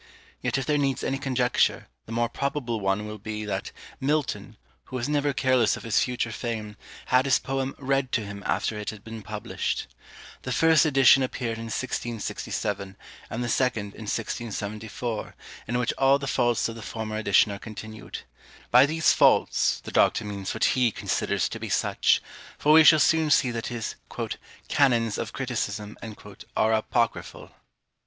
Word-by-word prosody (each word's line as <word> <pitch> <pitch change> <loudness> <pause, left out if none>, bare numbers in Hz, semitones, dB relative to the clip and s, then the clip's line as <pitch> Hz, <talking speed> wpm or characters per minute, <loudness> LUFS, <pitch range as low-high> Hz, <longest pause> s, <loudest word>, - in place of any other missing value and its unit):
Yet - - 0
if 135 - -2
there 150 +1 +1
needs 135 -2 0
any 135 - -1
conjecture, 125 -2 +1 0.2
the - - -9
more 120 +1 +1
probable 125 -2 -2
one 95 +1 0
will 105 0 -7
be, 110 +1 -5
that 105 - -3 0.3
Milton, 150 +2 -1 0.3
who - - -9
was 125 0 -2
never 145 -1 +1
careless 130 -3 +2
of - - -10
his 115 - +2
future 125 -2 -1
fame, 110 -2 -4 0.4
had 130 +1 +5
his 135 - +4
poem 135 0 -3
read 135 -1 0
to 115 -4 0
him 100 0 -7
after 105 +6 -1
it 105 - -4
had 110 -1 -9
been 110 0 -8
published. 105 0 -3 0.6
The - - -5
first 160 0 +5
edition 135 -1 +6
appeared 120 -3 -2
in 115 - -6
1667, 105 -4 -3 0.3
and 120 +2 -3
the - - -2
second 110 -5 0
in 110 - -9
1674, 110 0 -4 0.3
in 120 - -1
which 125 -1 0
all 135 +1 +5
the 140 - -6
faults 120 -3 +1
of 115 - -5
the 115 - -9
former 110 -1 -5
edition 105 -1 +3
are 100 - -6
continued. 110 0 -8 0.5
By 125 +3 +7
these 160 +1 +3
faults, - - +3
the - - -7
Doctor 110 - +3
means 100 -2 -4
what - - -2
he 125 -2 +3
considers - - -1
to - - -6
be - - -5
such: - - +2 0.3
for 150 - +3
we 160 0 +9
shall 155 0 +8
soon 160 +1 +3
see 130 -3 +4
that 115 -1 -4
his 120 -2 -4 0.7
"Canons 115 -6 +2
of 110 - -4
Criticism" 110 -5 -3 0.6
are 110 +1 +3
apocryphal. 115 +1 -1
120 Hz, 170 wpm, -26 LUFS, 110-135 Hz, 0.7 s, we